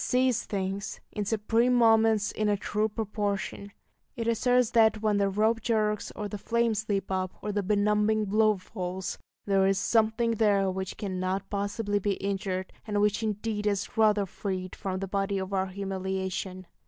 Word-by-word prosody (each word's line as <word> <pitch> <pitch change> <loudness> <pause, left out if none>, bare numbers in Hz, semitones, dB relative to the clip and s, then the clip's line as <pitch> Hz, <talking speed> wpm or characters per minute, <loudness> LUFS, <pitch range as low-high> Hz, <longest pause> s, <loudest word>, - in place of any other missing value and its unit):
It - - -2
sees 250 -2 +2
things, 195 0 -3
in 210 - -3
supreme 225 +4 +2
moments, 225 -2 +4
in 215 -1 0
a 205 - +2
true 210 +2 -1
proportion. 205 -2 -3 0.4
It 230 -1 -3
asserts 245 +1 +2
that 220 -2 +4
when 210 -1 +2
the 200 -1 +2
rope 220 +3 +1
jerks, 215 -2 0
or 210 - -3
the 205 0 -6
flames 225 -1 0
leap 195 -1 -1
up, 185 -1 -1
or 210 - -2
the 205 0 0
benumbing 210 +2 +2
blow 215 +1 +3
falls, 185 -1 -5 0.3
there 195 -1 +3
is 195 0 +2
something 225 +2 +2
there 200 -4 +2
which 190 0 -5
cannot 185 -1 -3
possibly 205 +1 -1
be 205 0 0
injured, 190 -1 -3
and 205 -1 0
which 210 +1 +2
indeed 210 0 -2
is 200 -1 -1
rather 215 -2 +4
freed 185 -1 -4
from 190 -2 -3
the 195 - -2
body 195 +1 -1
of 190 +1 -4
our 190 0 +1
humiliation. 190 -1 -4
205 Hz, 170 wpm, -28 LUFS, 195-220 Hz, 0.4 s, moments